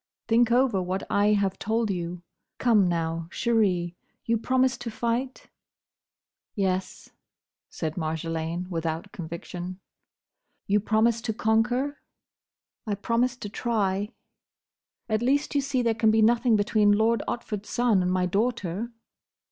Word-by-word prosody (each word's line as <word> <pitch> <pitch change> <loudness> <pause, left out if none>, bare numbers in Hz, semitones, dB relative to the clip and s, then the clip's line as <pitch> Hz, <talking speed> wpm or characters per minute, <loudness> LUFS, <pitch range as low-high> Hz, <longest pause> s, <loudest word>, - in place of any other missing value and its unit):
Think 235 +1 +4
over 245 -5 +3
what 185 +1 -2
I 205 +1 +4
have 195 -2 0
told 220 0 0
you. 175 -1 -4 0.3
Come, 220 -6 +4
now, 165 -1 -1
chérie, 185 -7 +1 0.3
you 230 - +2
promise 255 +3 +2
to 240 - -5
fight?" 240 +4 -2 1.1
"Yes," 190 -2 -2 0.6
said 160 0 -4
Marjolaine, 165 +2 -3
without 165 +3 -3
conviction. 175 +2 -7 0.9
"You 205 +1 +3
promise 220 +2 +2
to 230 -2 -2
conquer?" 245 +6 +1 0.9
"I 205 - 0
promise 235 +5 0
to 210 - -6
try." 205 -2 -1 1.0
"At 215 -1 0
least 280 +4 +1
you 285 - +2
see 270 -2 0
there 230 -1 +2
can 220 0 +2
be 220 0 +4
nothing 235 +1 +4
between 205 0 +3
Lord 225 +2 +2
Otford's 210 -3 -4
son 235 -6 +2
and 180 0 0
my 185 0 +1
daughter?" 210 +1 -1
210 Hz, 130 wpm, -26 LUFS, 180-235 Hz, 1.1 s, Think